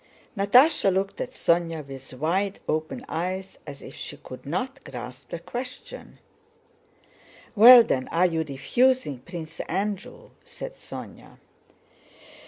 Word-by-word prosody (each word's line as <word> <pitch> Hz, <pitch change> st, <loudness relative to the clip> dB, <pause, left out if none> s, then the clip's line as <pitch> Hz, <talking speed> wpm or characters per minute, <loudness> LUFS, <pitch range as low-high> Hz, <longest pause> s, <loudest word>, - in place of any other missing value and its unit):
Natásha 205 Hz, +3 st, +5 dB
looked 195 Hz, +1 st, -1 dB
at -, -, -3 dB
Sónya 165 Hz, -3 st, 0 dB
with 135 Hz, -1 st, -10 dB
wide 185 Hz, +8 st, -1 dB
open 155 Hz, +12 st, -2 dB
eyes 185 Hz, +3 st, -4 dB
as 140 Hz, -1 st, -9 dB
if 135 Hz, -, -10 dB
she -, -, -8 dB
could 130 Hz, +1 st, -11 dB
not 220 Hz, -, -3 dB
grasp 125 Hz, 0 st, -9 dB
the -, -, -4 dB
question. 250 Hz, +8 st, -8 dB, 1.4 s
"Well, 235 Hz, +3 st, +10 dB
then, 130 Hz, -11 st, -1 dB
are 170 Hz, +3 st, +2 dB
you 165 Hz, -3 st, +1 dB
refusing 155 Hz, -, +1 dB
Prince 165 Hz, +2 st, -9 dB
Andrew?" 200 Hz, +2 st, -4 dB
said -, -, -8 dB
Sónya. -, -, -11 dB
180 Hz, 120 wpm, -25 LUFS, 150-210 Hz, 1.4 s, Well